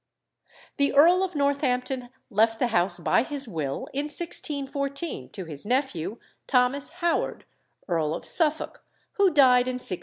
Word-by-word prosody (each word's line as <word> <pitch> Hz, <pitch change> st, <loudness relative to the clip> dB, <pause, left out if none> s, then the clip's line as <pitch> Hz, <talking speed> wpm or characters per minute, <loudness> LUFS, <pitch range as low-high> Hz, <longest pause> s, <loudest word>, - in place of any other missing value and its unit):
The 280 Hz, 0 st, +1 dB
Earl 345 Hz, +6 st, +6 dB
of 370 Hz, -3 st, -3 dB
Northampton 265 Hz, -3 st, 0 dB, 0.2 s
left 225 Hz, +2 st, +3 dB
the 245 Hz, +1 st, 0 dB
house 175 Hz, -4 st, +1 dB
by 170 Hz, -, +2 dB
his 280 Hz, +1 st, 0 dB
will, 155 Hz, -9 st, -4 dB
in 285 Hz, +2 st, -1 dB
1614, 280 Hz, -, -3 dB
to 190 Hz, -, -6 dB
his 150 Hz, -4 st, -4 dB
nephew, 235 Hz, -, -1 dB, 0.3 s
Thomas 265 Hz, +2 st, +2 dB, 0.2 s
Howard, 340 Hz, -, 0 dB, 0.4 s
Earl 160 Hz, -4 st, 0 dB
of -, -, -8 dB
Suffolk, 315 Hz, -2 st, -1 dB, 0.3 s
who 400 Hz, -1 st, +5 dB
died 255 Hz, -5 st, +5 dB
in 255 Hz, -, -2 dB
1626. 190 Hz, -8 st, -2 dB
260 Hz, 145 wpm, -26 LUFS, 210-285 Hz, 0.4 s, Earl